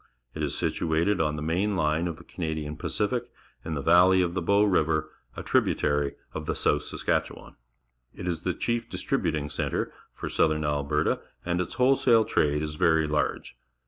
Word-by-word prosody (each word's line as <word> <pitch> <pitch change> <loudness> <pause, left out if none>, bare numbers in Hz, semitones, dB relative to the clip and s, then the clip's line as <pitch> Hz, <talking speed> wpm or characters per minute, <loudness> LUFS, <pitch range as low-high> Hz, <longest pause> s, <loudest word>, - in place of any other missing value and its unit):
It - - -6
is - - -1
situated 85 +4 +1
on 75 -1 0
the 75 - -4
main 95 +6 0
line 80 0 +1
of 85 - -4
the 85 - -13
Canadian 80 -4 -4
Pacific, - - -1 0.3
in 80 - -4
the 70 - -3
valley 90 +4 +6
of 85 - -1
the^^ 90 -1 -3
ow 100 +1 +5
Riv 90 -6 +2
er, 75 -1 -1 0.3
a - - -5
tributary 75 -1 +1 0.2
of - - -6
the - - -1
South 75 - +2
Saskatchewan. - - -3 0.6
It 90 - -6
is 85 -3 -2
the 90 -2 -2
chief 120 0 -2
distri 135 -2 -1
buting 75 -4 -2
centre - - -2 0.2
for - - -6
southern 80 -1 +1
Alberta, 75 +1 0 0.2
and 90 0 0
its 90 - -5
wholesale 125 -3 +4
trade 75 0 +1
is 75 0 -5
verj 80 -2 +3
large. 75 - -1
80 Hz, 180 wpm, -27 LUFS, 75-90 Hz, 0.6 s, valley